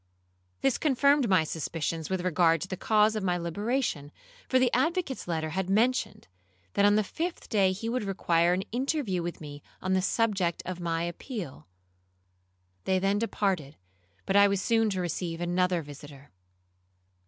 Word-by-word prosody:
This 270 Hz, -3 st, +1 dB
confirmed 280 Hz, -3 st, +3 dB
my 185 Hz, -4 st, +4 dB
suspicions 160 Hz, 0 st, -3 dB
with 190 Hz, -1 st, -1 dB
regard 165 Hz, -2 st, +3 dB
to -, -, -4 dB
the 185 Hz, -, -4 dB
cause 215 Hz, +2 st, +3 dB
of 215 Hz, -, -1 dB
my 180 Hz, -2 st, 0 dB
liberation, 175 Hz, -, -2 dB, 0.4 s
for 260 Hz, -, +4 dB
the 255 Hz, -2 st, +2 dB
advocate's 320 Hz, -, 0 dB
letter 160 Hz, -2 st, -2 dB
had 190 Hz, +2 st, -2 dB
mentioned, 225 Hz, +1 st, +1 dB, 0.5 s
that 200 Hz, -, +3 dB
on 205 Hz, 0 st, +5 dB
the 215 Hz, -, +3 dB
fifth 335 Hz, -, -5 dB
day 195 Hz, -4 st, +3 dB
he 200 Hz, +4 st, -5 dB
would 240 Hz, 0 st, -1 dB
require 175 Hz, -3 st, +2 dB
an 185 Hz, +2 st, 0 dB
interview 250 Hz, -, -1 dB
with 170 Hz, 0 st, -5 dB
me 145 Hz, -2 st, -9 dB, 0.2 s
on 190 Hz, 0 st, -1 dB
the 190 Hz, -, +2 dB
subject 195 Hz, -4 st, 0 dB
of 185 Hz, 0 st, -5 dB
my 165 Hz, -1 st, -1 dB
appeal. 175 Hz, -, -6 dB, 1.2 s
They 190 Hz, -, +2 dB
then 195 Hz, +2 st, +1 dB
departed; 190 Hz, -10 st, -1 dB, 0.5 s
but 195 Hz, -, -1 dB
I 200 Hz, 0 st, +7 dB
was 200 Hz, -1 st, 0 dB
soon 225 Hz, +2 st, +2 dB
to 190 Hz, -2 st, -2 dB
receive 170 Hz, -1 st, -3 dB
another 175 Hz, 0 st, 0 dB
visitor. 145 Hz, -1 st, -12 dB
190 Hz, 165 wpm, -28 LUFS, 170-225 Hz, 1.2 s, I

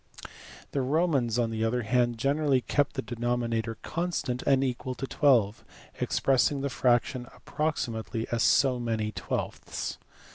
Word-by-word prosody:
The 140 Hz, -, 0 dB
Romans, 135 Hz, -5 st, +1 dB
on 115 Hz, -2 st, +1 dB
the 110 Hz, 0 st, -2 dB
other 120 Hz, +2 st, 0 dB
hand, 120 Hz, +1 st, +1 dB
generally 140 Hz, +1 st, +2 dB
kept 145 Hz, +3 st, 0 dB
the 135 Hz, -, -2 dB
denominator 120 Hz, -2 st, -2 dB
constant 160 Hz, -7 st, -2 dB
and 135 Hz, -1 st, +4 dB
equal 130 Hz, 0 st, -2 dB
to 135 Hz, -, -4 dB
twelve, 120 Hz, -8 st, +2 dB, 0.4 s
expressing 135 Hz, +1 st, +2 dB
the 140 Hz, -1 st, -2 dB
fraction 125 Hz, 0 st, +1 dB
(approxi 155 Hz, -4 st, -2 dB
mately) 110 Hz, 0 st, -4 dB
as 120 Hz, -1 st, 0 dB
so 130 Hz, -3 st, +4 dB
many 110 Hz, -3 st, -1 dB
twelfths. -, -, -4 dB
125 Hz, 140 wpm, -28 LUFS, 115-135 Hz, 0.4 s, and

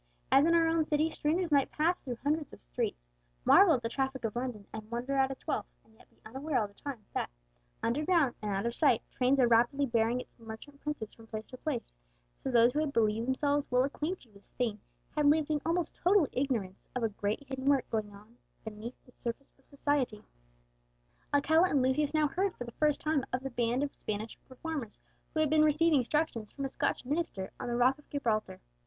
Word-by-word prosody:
As 275 Hz, +2 st, +6 dB
in 335 Hz, +1 st, +4 dB
our 330 Hz, -1 st, +4 dB
own 325 Hz, 0 st, +3 dB
city, 310 Hz, +2 st, +2 dB
strangers 325 Hz, +3 st, 0 dB
might 280 Hz, -2 st, +4 dB
pass 335 Hz, +4 st, +1 dB
through 245 Hz, -4 st, -5 dB
hundreds 300 Hz, +1 st, 0 dB
of -, -, -12 dB
streets, -, -, -3 dB, 0.4 s
marvel 360 Hz, -6 st, +7 dB
at 245 Hz, -, -4 dB
the -, -, 0 dB
traffic 265 Hz, 0 st, -2 dB
of 220 Hz, -, -2 dB
London, 240 Hz, -4 st, -3 dB
and 215 Hz, -1 st, -7 dB
wonder 240 Hz, +3 st, -3 dB
at 265 Hz, -1 st, +3 dB
its 270 Hz, -, -7 dB
wealth, -, -, -1 dB, 0.2 s
and 220 Hz, -, -25 dB
yet 220 Hz, -, -21 dB
be -, -, -31 dB
unaware 265 Hz, +6 st, -2 dB
all 215 Hz, -, 0 dB
the 200 Hz, -, -21 dB
time 240 Hz, -2 st, -7 dB
that, -, -, -1 dB, 0.5 s
underground 295 Hz, +2 st, +2 dB
and 210 Hz, -, -3 dB
out 195 Hz, +3 st, -1 dB
of 235 Hz, -, 0 dB
sight, 265 Hz, -4 st, +3 dB
trains 260 Hz, +2 st, +2 dB
are 250 Hz, -, +6 dB
rapidly 240 Hz, +5 st, +4 dB
bearing 230 Hz, 0 st, +1 dB
its 250 Hz, -, -11 dB
merchant 230 Hz, +6 st, -10 dB
princes 295 Hz, -8 st, -4 dB
from 225 Hz, -1 st, -16 dB
place 220 Hz, 0 st, -5 dB
to 255 Hz, -, -9 dB
place, 250 Hz, -, -4 dB, 0.4 s
so -, -, -3 dB
those 240 Hz, -1 st, +5 dB
who 300 Hz, -, +1 dB
had 305 Hz, -2 st, 0 dB
believed 225 Hz, -1 st, +1 dB
themselves 285 Hz, +2 st, +1 dB
well 250 Hz, 0 st, +4 dB
acquainted 295 Hz, -, -4 dB
with 200 Hz, 0 st, -18 dB
Spain 225 Hz, -4 st, -2 dB, 0.4 s
had 300 Hz, -1 st, +3 dB
lived 305 Hz, +1 st, +3 dB
in 300 Hz, -1 st, +1 dB
almost 335 Hz, 0 st, 0 dB
total 365 Hz, -3 st, +4 dB
ignorance 235 Hz, -8 st, -2 dB
of 250 Hz, -, -1 dB
a 225 Hz, -, +2 dB
great 205 Hz, +5 st, -2 dB
hidden 265 Hz, 0 st, -5 dB
work 275 Hz, -2 st, +3 dB
going 215 Hz, -2 st, -1 dB
on 210 Hz, +4 st, -16 dB, 0.3 s
beneath 220 Hz, +3 st, -7 dB
the 250 Hz, -, -19 dB
surface 240 Hz, +3 st, -6 dB
of 270 Hz, -, -29 dB
society. 280 Hz, -7 st, -1 dB, 1.1 s
Alcala 320 Hz, +5 st, +4 dB
and 280 Hz, -5 st, +2 dB
Lucius 280 Hz, +3 st, +2 dB
now 310 Hz, -1 st, +3 dB
heard 375 Hz, +6 st, -1 dB
for -, -, -5 dB
the 235 Hz, -, -8 dB
first 300 Hz, +3 st, +1 dB
time 305 Hz, -3 st, +1 dB
of 255 Hz, +1 st, -2 dB
the 270 Hz, -, -4 dB
band 240 Hz, +2 st, +1 dB
of 285 Hz, -, -3 dB
Spanish 215 Hz, +1 st, -4 dB
reformers 260 Hz, -4 st, -5 dB, 0.4 s
who 310 Hz, -, +3 dB
had 310 Hz, -, +2 dB
been 310 Hz, 0 st, +5 dB
receiving 310 Hz, 0 st, +4 dB
instruction 255 Hz, -2 st, 0 dB
from 275 Hz, +5 st, -5 dB
a -, -, -2 dB
Scotch -, -, -1 dB
minister 285 Hz, -, -2 dB
on -, -, -4 dB
the 240 Hz, -, -1 dB
rock 255 Hz, +4 st, +3 dB
of 295 Hz, -, -21 dB
Gibraltar. 220 Hz, -, -1 dB
265 Hz, 215 wpm, -31 LUFS, 230-300 Hz, 1.1 s, marvel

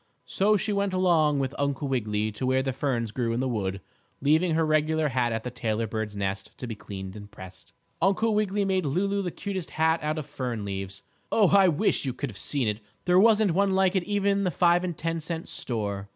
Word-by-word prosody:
So 210 Hz, +2 st, +2 dB
she 210 Hz, +1 st, -1 dB
went 200 Hz, -1 st, 0 dB
along 165 Hz, -5 st, +3 dB
with 135 Hz, -1 st, -1 dB
Uncle 140 Hz, 0 st, -1 dB
Wiggily 110 Hz, -4 st, -1 dB
to 105 Hz, +5 st, -4 dB
where 130 Hz, 0 st, +2 dB
the 135 Hz, -1 st, -2 dB
ferns 125 Hz, -5 st, -1 dB
grew 115 Hz, -1 st, -1 dB
in 115 Hz, -, -1 dB
the 130 Hz, -, 0 dB
wood, 100 Hz, -5 st, -2 dB, 0.4 s
leaving 160 Hz, +4 st, +3 dB
her 160 Hz, 0 st, +2 dB
regular 155 Hz, 0 st, +2 dB
hat 120 Hz, -2 st, 0 dB
at 110 Hz, -1 st, -2 dB
the 125 Hz, -, -4 dB
tailor 115 Hz, -2 st, -1 dB
bird's 110 Hz, -1 st, -4 dB
nest 95 Hz, 0 st, -4 dB
to -, -, -6 dB
be 115 Hz, -, -4 dB
cleaned 95 Hz, -2 st, -8 dB
and 105 Hz, -1 st, -10 dB
pressed. 95 Hz, -3 st, -12 dB, 0.3 s
Uncle 200 Hz, +5 st, +2 dB
Wiggily 205 Hz, -1 st, +1 dB
made 190 Hz, -1 st, +1 dB
Lulu 195 Hz, +7 st, 0 dB
the 180 Hz, -, -2 dB
cutest 190 Hz, -1 st, -5 dB
hat 160 Hz, +1 st, +3 dB
out 155 Hz, +1 st, -1 dB
of 155 Hz, -, -4 dB
fern 120 Hz, -7 st, -4 dB
leaves. 95 Hz, 0 st, -5 dB, 0.3 s
Oh, 205 Hz, -5 st, +4 dB
I 195 Hz, -1 st, +7 dB
wish 175 Hz, +5 st, +1 dB
you 130 Hz, -3 st, -2 dB
could 135 Hz, -1 st, -4 dB
have 100 Hz, -, -11 dB
seen 140 Hz, -5 st, -1 dB
it. 105 Hz, 0 st, -1 dB, 0.3 s
There 180 Hz, 0 st, +5 dB
wasn't 215 Hz, -2 st, +5 dB
one 195 Hz, +2 st, +2 dB
like 190 Hz, 0 st, +3 dB
it 190 Hz, -, +3 dB
even 200 Hz, -1 st, +1 dB
in -, -, 0 dB
the 185 Hz, -, +1 dB
five 175 Hz, +2 st, +3 dB
and 175 Hz, -3 st, -3 dB
ten 165 Hz, 0 st, -2 dB
cent 165 Hz, +1 st, -5 dB
store. 100 Hz, -4 st, -4 dB
145 Hz, 225 wpm, -27 LUFS, 110-185 Hz, 0.4 s, I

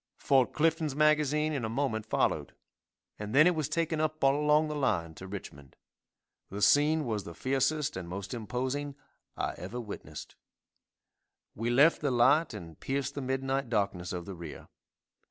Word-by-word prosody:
Fort 135 Hz, -3 st, +3 dB
Clifton's 160 Hz, -2 st, +1 dB
magazine 150 Hz, 0 st, +2 dB
in 135 Hz, -5 st, -2 dB
a 110 Hz, -, -2 dB
moment 115 Hz, -3 st, -2 dB
followed, -, -, 0 dB, 0.6 s
and 105 Hz, +3 st, -4 dB
then 155 Hz, +2 st, +8 dB
it 180 Hz, -, +5 dB
was 155 Hz, -3 st, -2 dB
taken 160 Hz, 0 st, 0 dB
up 155 Hz, -1 st, -2 dB
all 135 Hz, 0 st, +5 dB
along 150 Hz, +1 st, +3 dB
the 150 Hz, -, -4 dB
line 100 Hz, -, 0 dB
to 95 Hz, +4 st, -10 dB
Richmond. 70 Hz, -8 st, -9 dB, 0.7 s
The 100 Hz, +1 st, -3 dB
scene 150 Hz, +2 st, +4 dB
was 110 Hz, -4 st, -2 dB
the 85 Hz, -, -9 dB
fiercest 140 Hz, -, 0 dB
and 90 Hz, -2 st, -6 dB
most 95 Hz, +2 st, -6 dB
imposing 130 Hz, +5 st, -3 dB, 0.4 s
I -, -, -2 dB
ever 100 Hz, +7 st, -6 dB
witnessed. 110 Hz, -4 st, -8 dB, 1.2 s
We 115 Hz, +3 st, -2 dB
left 140 Hz, +7 st, +5 dB
the 145 Hz, -, +1 dB
light 130 Hz, +6 st, +4 dB
and 85 Hz, -6 st, -10 dB
pierced 135 Hz, -1 st, -2 dB
the 140 Hz, -, -4 dB
midnight 135 Hz, 0 st, -1 dB
darkness 100 Hz, -4 st, -1 dB
of 90 Hz, -2 st, -4 dB
the 100 Hz, -, -7 dB
rear. 85 Hz, -3 st, -9 dB
130 Hz, 165 wpm, -30 LUFS, 105-150 Hz, 1.2 s, then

